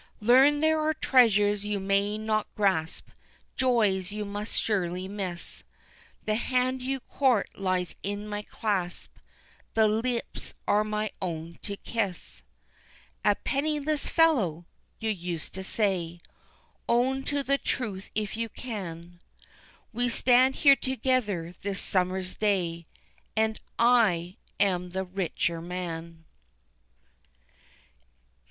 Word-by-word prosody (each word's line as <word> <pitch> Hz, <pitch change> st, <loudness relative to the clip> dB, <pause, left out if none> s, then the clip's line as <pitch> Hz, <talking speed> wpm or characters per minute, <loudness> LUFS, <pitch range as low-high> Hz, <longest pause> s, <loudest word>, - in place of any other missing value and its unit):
Learn 265 Hz, +6 st, +5 dB
there 315 Hz, 0 st, +3 dB
are 310 Hz, 0 st, +1 dB
treasures 210 Hz, -8 st, +4 dB
you 205 Hz, -1 st, -1 dB
may 200 Hz, +2 st, +1 dB
not 215 Hz, 0 st, 0 dB
grasp, 190 Hz, -6 st, 0 dB, 0.5 s
Joys 210 Hz, -7 st, +2 dB
you 210 Hz, 0 st, -3 dB
must 205 Hz, +2 st, -2 dB
surely 185 Hz, -3 st, -1 dB
miss, 190 Hz, -4 st, -6 dB, 0.6 s
The 215 Hz, -, +1 dB
hand 255 Hz, +3 st, 0 dB
you 265 Hz, +1 st, -2 dB
court 255 Hz, -6 st, +1 dB
lies 185 Hz, -2 st, -1 dB
in 205 Hz, +1 st, -4 dB
my 210 Hz, 0 st, -3 dB
clasp 200 Hz, -4 st, -3 dB, 0.6 s
The 220 Hz, -1 st, +5 dB
lips 230 Hz, +3 st, -2 dB
are 210 Hz, +1 st, +4 dB
my 215 Hz, -1 st, -2 dB
own 170 Hz, -2 st, -5 dB
to 200 Hz, -1 st, -5 dB
kiss. 200 Hz, -7 st, -3 dB, 0.8 s
A 205 Hz, -1 st, +4 dB
penniless 295 Hz, +2 st, -1 dB
fellow! 220 Hz, -, +3 dB, 0.3 s
you 225 Hz, -1 st, 0 dB
used 175 Hz, -4 st, -5 dB
to 190 Hz, -, -5 dB
say 185 Hz, -5 st, -1 dB, 0.7 s
Own 255 Hz, +3 st, +2 dB
to 285 Hz, -1 st, -1 dB
the 275 Hz, +1 st, +1 dB
truth 200 Hz, -6 st, -3 dB
if 210 Hz, -1 st, -2 dB
you 230 Hz, 0 st, -2 dB
can 175 Hz, -8 st, -7 dB, 0.7 s
We 245 Hz, +2 st, +1 dB
stand 255 Hz, +2 st, +4 dB
here 280 Hz, -2 st, +7 dB
together 250 Hz, -11 st, -1 dB
this 200 Hz, -1 st, -3 dB
summer's 185 Hz, 0 st, 0 dB
day, 175 Hz, -6 st, 0 dB, 0.5 s
And 220 Hz, 0 st, +1 dB, 0.2 s
I 205 Hz, -8 st, +3 dB, 0.2 s
am 180 Hz, -3 st, +1 dB
the 190 Hz, 0 st, -1 dB
richer 180 Hz, -2 st, -2 dB
man. 170 Hz, -2 st, -6 dB
205 Hz, 115 wpm, -28 LUFS, 185-245 Hz, 0.8 s, here